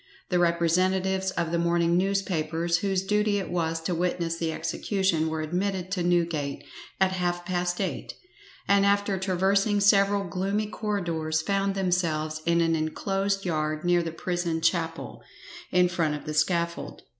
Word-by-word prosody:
The 180 Hz, -3 st, +2 dB
representatives 185 Hz, +3 st, +1 dB
of 170 Hz, -3 st, -2 dB
the 170 Hz, -, +1 dB
morning 170 Hz, 0 st, +2 dB
newspapers 175 Hz, -3 st, 0 dB
whose 190 Hz, 0 st, 0 dB
duty 210 Hz, +1 st, +1 dB
it 195 Hz, -, -4 dB
was 165 Hz, -2 st, -1 dB
to 170 Hz, +2 st, -2 dB
witness 170 Hz, -1 st, -1 dB
the 165 Hz, -1 st, -1 dB
execution 180 Hz, -2 st, 0 dB
were 160 Hz, 0 st, -2 dB
admitted 185 Hz, +3 st, -2 dB
to 190 Hz, -2 st, -1 dB
Newgate 170 Hz, -5 st, 0 dB, 0.4 s
at 190 Hz, -1 st, +3 dB
half 175 Hz, -1 st, -2 dB
past 175 Hz, -1 st, -1 dB
eight, 195 Hz, -, -3 dB, 0.5 s
and 200 Hz, 0 st, +4 dB
after 200 Hz, -1 st, +2 dB
traversing 195 Hz, +2 st, +2 dB
several 200 Hz, 0 st, +4 dB
gloomy 195 Hz, +4 st, -1 dB
corridors 170 Hz, -7 st, -2 dB
found 195 Hz, +1 st, 0 dB
themselves 165 Hz, -5 st, 0 dB
in 170 Hz, 0 st, +3 dB
an 165 Hz, 0 st, +2 dB
inclosed 195 Hz, +5 st, -1 dB
yard 155 Hz, -1 st, -1 dB
near 175 Hz, 0 st, +3 dB
the 165 Hz, -1 st, -4 dB
prison 175 Hz, 0 st, -2 dB
chapel, 165 Hz, 0 st, -1 dB, 0.5 s
in 180 Hz, 0 st, +4 dB
front 165 Hz, -4 st, 0 dB
of 150 Hz, -, -8 dB
the 155 Hz, -, -4 dB
scaffold. 170 Hz, +2 st, -1 dB
175 Hz, 150 wpm, -26 LUFS, 165-195 Hz, 0.5 s, and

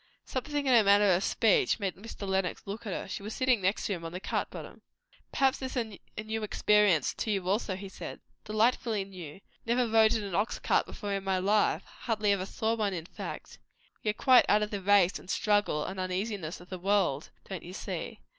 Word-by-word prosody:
Something 290 Hz, +2 st, -3 dB
in 260 Hz, -, +4 dB
her 230 Hz, -2 st, +7 dB
manner 200 Hz, 0 st, +5 dB
of 180 Hz, +3 st, +1 dB
speech 420 Hz, -, +2 dB
made 195 Hz, -3 st, -1 dB
Mr. 205 Hz, 0 st, -8 dB
Lenox 190 Hz, -2 st, -1 dB
look 215 Hz, +3 st, -6 dB
at -, -, -3 dB
her. -, -, -4 dB
She 190 Hz, -, -5 dB
was 210 Hz, +2 st, -6 dB
sitting 255 Hz, -5 st, +2 dB
next 190 Hz, +3 st, 0 dB
him 180 Hz, -5 st, -3 dB
on 165 Hz, -, -5 dB
the 180 Hz, -, -5 dB
cart -, -, -2 dB
bottom. -, -, -10 dB, 0.5 s
"Perhaps 270 Hz, -2 st, +2 dB
this 260 Hz, 0 st, -4 dB
is 220 Hz, -5 st, -3 dB, 0.2 s
a 215 Hz, -, -3 dB
new 220 Hz, +1 st, -3 dB
experience 210 Hz, -6 st, +3 dB
also 200 Hz, 0 st, -1 dB
to -, -, -7 dB
you?" -, -, -10 dB
he 200 Hz, -, -6 dB
said. 190 Hz, -, -8 dB, 0.2 s
"Delightfully 215 Hz, -1 st, +1 dB
new. 185 Hz, -3 st, -10 dB, 0.2 s
Never 240 Hz, +1 st, +1 dB
rode 220 Hz, 0 st, +5 dB
in 220 Hz, -, -1 dB
an 200 Hz, -3 st, -6 dB
ox 205 Hz, +6 st, 0 dB
cart -, -, +1 dB
before 205 Hz, -2 st, -5 dB
in 195 Hz, -1 st, -2 dB
my 190 Hz, -1 st, 0 dB
life; 205 Hz, +3 st, +2 dB
hardly 215 Hz, -3 st, -1 dB
ever 195 Hz, -1 st, 0 dB
saw 220 Hz, +2 st, -1 dB
one, 210 Hz, -4 st, -1 dB
in 165 Hz, -2 st, -5 dB
fact. -, -, -8 dB, 0.4 s
We 215 Hz, -, 0 dB
are -, -, +2 dB
quite 255 Hz, +1 st, +6 dB
out 210 Hz, +1 st, +4 dB
of 210 Hz, -, -4 dB
the 200 Hz, -2 st, -3 dB
race 195 Hz, -1 st, +4 dB
and -, -, -15 dB
struggle 205 Hz, -9 st, +1 dB
and 190 Hz, 0 st, -5 dB
uneasiness 185 Hz, -2 st, -3 dB
of 175 Hz, -, -15 dB
the 185 Hz, -, -5 dB
world, 185 Hz, -6 st, +1 dB, 0.2 s
don't 190 Hz, -3 st, -5 dB
you 180 Hz, -, -10 dB
see? -, -, -5 dB
205 Hz, 220 wpm, -30 LUFS, 190-220 Hz, 0.5 s, her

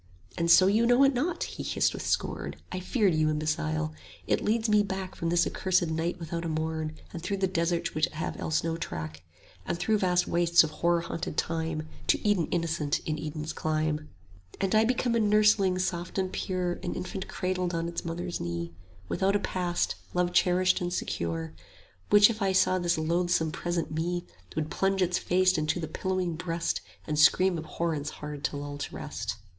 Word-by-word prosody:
And 170 Hz, 0 st, 0 dB
so 185 Hz, +2 st, +8 dB
you 215 Hz, +4 st, +3 dB
know 245 Hz, +3 st, +5 dB
it 275 Hz, 0 st, +5 dB
not! 325 Hz, +7 st, -1 dB
he -, -, -6 dB
hissed -, -, +1 dB
with -, -, -5 dB
scorn; -, -, -1 dB
55 -, -, -21 dB
I -, -, -2 dB
feared 205 Hz, -4 st, +2 dB
you, 155 Hz, 0 st, +2 dB
imbecile! 80 Hz, -, -1 dB, 0.3 s
It -, -, +1 dB
leads 220 Hz, +1 st, +1 dB
me 210 Hz, -1 st, +5 dB
back 190 Hz, -2 st, -4 dB
From 165 Hz, -, -3 dB
this 170 Hz, 0 st, +3 dB
accursed 185 Hz, -1 st, +1 dB
night 165 Hz, +2 st, -2 dB
without 170 Hz, 0 st, -4 dB
a 165 Hz, -, -2 dB
morn, 160 Hz, 0 st, -2 dB, 0.2 s
And 170 Hz, -, -5 dB
through 200 Hz, +3 st, -2 dB
the 190 Hz, -, +1 dB
deserts 170 Hz, -2 st, 0 dB
which 155 Hz, +1 st, +2 dB
have 160 Hz, +2 st, -5 dB
else 155 Hz, -1 st, 0 dB
no 165 Hz, 0 st, -1 dB
track, 80 Hz, -, -5 dB, 0.4 s
And 170 Hz, -, -2 dB
through 215 Hz, +4 st, +1 dB
vast 180 Hz, -2 st, +2 dB
wastes 170 Hz, -1 st, +5 dB
of 155 Hz, -, -3 dB
horror 170 Hz, +1 st, +1 dB
haunted 170 Hz, 0 st, -5 dB
time, 160 Hz, -1 st, -1 dB, 0.2 s
To -, -, +2 dB
Eden 195 Hz, -6 st, +2 dB
innocence 165 Hz, -4 st, 0 dB
in 155 Hz, -1 st, -2 dB
Eden's 155 Hz, 0 st, -4 dB
clime: 155 Hz, -1 st, -1 dB, 0.4 s
60 -, -, -14 dB
And 195 Hz, 0 st, +1 dB
I 220 Hz, +1 st, +5 dB
become 245 Hz, 0 st, +1 dB
a 235 Hz, -, +3 dB
nursling 210 Hz, -3 st, +4 dB
soft 180 Hz, -1 st, -2 dB
and 185 Hz, -1 st, -1 dB
pure, 180 Hz, -2 st, -2 dB
An 175 Hz, -, -3 dB
infant 185 Hz, +1 st, -5 dB
cradled 185 Hz, -1 st, -2 dB
on 165 Hz, 0 st, -1 dB
its 170 Hz, -, -4 dB
mother's 175 Hz, +1 st, -4 dB
knee, 85 Hz, 0 st, -4 dB, 0.3 s
Without 195 Hz, -, +1 dB
a -, -, +3 dB
past, 180 Hz, -3 st, -1 dB, 0.2 s
love 180 Hz, 0 st, +1 dB
cherished 185 Hz, +1 st, +3 dB
and 175 Hz, 0 st, -2 dB
secure; 85 Hz, -, -3 dB, 0.6 s
Which 205 Hz, +2 st, +7 dB
if 220 Hz, -1 st, -7 dB
it 190 Hz, -1 st, +2 dB
saw 185 Hz, 0 st, +3 dB
this 175 Hz, -1 st, +1 dB
loathsome 165 Hz, 0 st, +1 dB
present 175 Hz, 0 st, -2 dB
Me, 175 Hz, +3 st, -2 dB, 0.3 s
Would 155 Hz, 0 st, -2 dB
plunge 195 Hz, +1 st, +1 dB
its 180 Hz, 0 st, +1 dB
face 185 Hz, -1 st, +3 dB
into 155 Hz, +3 st, 0 dB
the 160 Hz, -, -3 dB
pillowing 185 Hz, -2 st, -2 dB
breast, 170 Hz, 0 st, -1 dB, 0.3 s
65 -, -, -23 dB
And 150 Hz, -1 st, 0 dB
scream 185 Hz, +4 st, +5 dB
abhorrence 155 Hz, -2 st, -2 dB
hard 150 Hz, -1 st, -7 dB
to 145 Hz, -, -2 dB
lull 145 Hz, 0 st, -6 dB
to -, -, -5 dB
rest. -, -, -4 dB
170 Hz, 195 wpm, -28 LUFS, 155-185 Hz, 0.6 s, so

